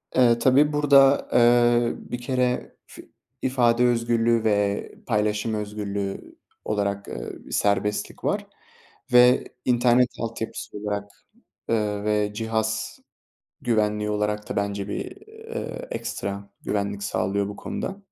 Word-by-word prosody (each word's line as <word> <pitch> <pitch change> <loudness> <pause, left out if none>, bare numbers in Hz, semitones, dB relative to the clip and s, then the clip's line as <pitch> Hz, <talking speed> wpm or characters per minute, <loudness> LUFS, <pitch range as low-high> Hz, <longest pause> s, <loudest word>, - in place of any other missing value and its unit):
Eee, 120 -2 +5
tabii 140 +5 +4
burada, 140 -2 +5
eee, 120 0 +4
bir 120 0 -7
kere 125 0 -1
fi - - -14 0.3
ifade 125 -2 +3
özgürlüğü 115 -1 +2
ve 105 -2 0 0.2
paylaşım 105 -1 0
özgürlüğü 105 -2 -4 0.3
olarak, 100 -1 -1
eee, - - -6 0.2
serbestlik 105 0 0
var - - -1 0.7
ve 125 +1 +6 0.2
internet 125 0 +4
altyapısı 115 -2 -5
olarak, 100 -1 -4 0.6
ııı, 105 -2 0
ve 105 -1 +1
cihaz 110 0 -2 0.6
güvenliği 105 -2 +1
olarak 105 0 -2
da - - -3
bence 100 -1 -2
bir, - - -3 0.2
eee, 450 +3 -7
ekstra 100 - -4
güvenlik 100 -1 -2
sağlıyor 100 0 -1
bu 100 - -7
konuda. 195 - -5
110 Hz, 115 wpm, -24 LUFS, 105-120 Hz, 0.7 s, ve